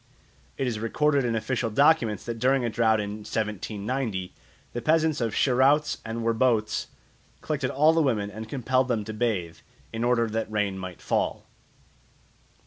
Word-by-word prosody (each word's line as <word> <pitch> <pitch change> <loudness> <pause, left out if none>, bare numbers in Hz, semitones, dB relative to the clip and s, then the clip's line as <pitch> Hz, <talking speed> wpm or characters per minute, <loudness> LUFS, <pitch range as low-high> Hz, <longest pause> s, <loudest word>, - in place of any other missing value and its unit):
It 135 - -1
is 115 -4 -2
recorded 140 +4 +1
in 115 -1 0
official 115 +1 -1
documents 125 -3 +3
that 115 -1 -4
during 130 +1 +2
a 115 - -1
drought 110 -1 +3
in 105 0 -4
1790 105 0 -3 0.4
the 120 - -3
peasants 155 +1 +2
of 115 -3 -1
Scheroutz 140 +3 +3
and 115 +1 -4
Werboutz 115 -2 +1 0.5
collected 150 -4 -2
all 155 +4 +4
the 165 - +3
women 110 -8 0
and 110 +2 -8
compelled 130 -1 +1
them 115 -4 0
to 110 - -6
bathe, 100 -8 -1 0.4
in 115 +1 -2
order 120 -1 +3
that 110 0 -3
rain 105 -2 0
might 95 -2 -8
fall. - - -1
115 Hz, 155 wpm, -26 LUFS, 110-130 Hz, 0.5 s, all